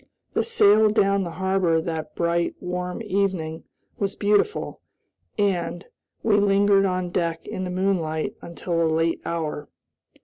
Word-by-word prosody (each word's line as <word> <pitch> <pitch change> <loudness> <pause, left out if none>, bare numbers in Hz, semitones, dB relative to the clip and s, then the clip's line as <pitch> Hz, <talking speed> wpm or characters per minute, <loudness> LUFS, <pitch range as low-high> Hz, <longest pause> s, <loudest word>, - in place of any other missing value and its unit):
The - - +1
sail 215 - +5
down 200 -2 +2
the 175 - -4
harbor 185 -1 +1
that 160 -2 -4
bright, 170 0 0
warm 180 +3 -4
evening 185 -6 -1 0.3
was 200 -1 -1
beautiful, 210 - 0 0.6
and, 185 -3 0 0.4
we 210 -2 +3
lingered 200 0 +4
on 180 -1 -1
deck 165 -2 -2
in 185 - -4
the - - -4
moonlight 180 -4 -1
until 170 0 -3
a 165 - +3
late 165 +1 +1
hour. 155 -3 -3
180 Hz, 135 wpm, -24 LUFS, 165-200 Hz, 0.6 s, sail